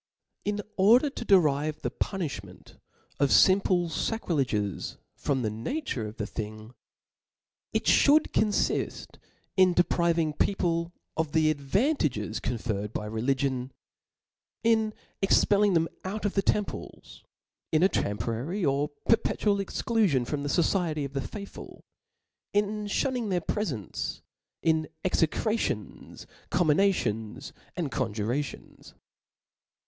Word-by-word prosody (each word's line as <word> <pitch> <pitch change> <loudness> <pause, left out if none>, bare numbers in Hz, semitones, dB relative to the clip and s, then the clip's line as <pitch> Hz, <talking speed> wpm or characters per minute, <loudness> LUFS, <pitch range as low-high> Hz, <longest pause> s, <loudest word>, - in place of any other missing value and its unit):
In 205 0 -1
order 235 +9 +5
to 265 - -6
derive 155 -7 +3
the - - -1
punifhment 135 - -5 0.4
of 140 0 +3
fimple 185 -1 +4
fa 225 - -1
crileges 120 - -1 0.2
from 135 -3 -1
the 110 - 0
nature 115 - -3
of 105 +2 -10
the 105 - -2
thing 110 +2 -7 0.5
*, - - -66
it - - +1
ihooki 300 +2 +5
confift 215 -1 0 0.4
in 185 -1 +6
depriving 170 -2 +2
people 170 -1 0 0.2
of 160 -1 -1
the 155 -1 +4
advanuges 145 - 0
con 120 +1 -2
ferred 105 -2 -3
by 105 - -3
religion 130 +3 -1 0.9
in 220 -2 +2 0.3
expelling 200 0 +4
them 165 0 +3 0.2
out 210 +3 -4
of 205 - 0
the 195 - +2
temples, 205 +1 -3 0.5
in 155 +2 +3
a - - +7
temporary 115 - -2
or 140 +1 +1 0.2
perpetual 215 -2 +2
exciufiott 195 - +1
from 145 +3 -3
the 145 - -3
focicty 160 -2 +1
of 140 - -7
the 135 - -1
faithfol, 200 +6 -9 0.7
in 210 +1 0
ifaunning 250 +3 0
rfidr 180 -4 -1
prefence, 145 - -3 0.4
in 160 -1 +2 0.2
execrations, 180 - -1 0.2
comminations, 150 - +1 0.2
arid 160 -6 -2
coo 130 -3 0
Jurations. 120 +7 -4
160 Hz, 120 wpm, -28 LUFS, 125-200 Hz, 0.9 s, a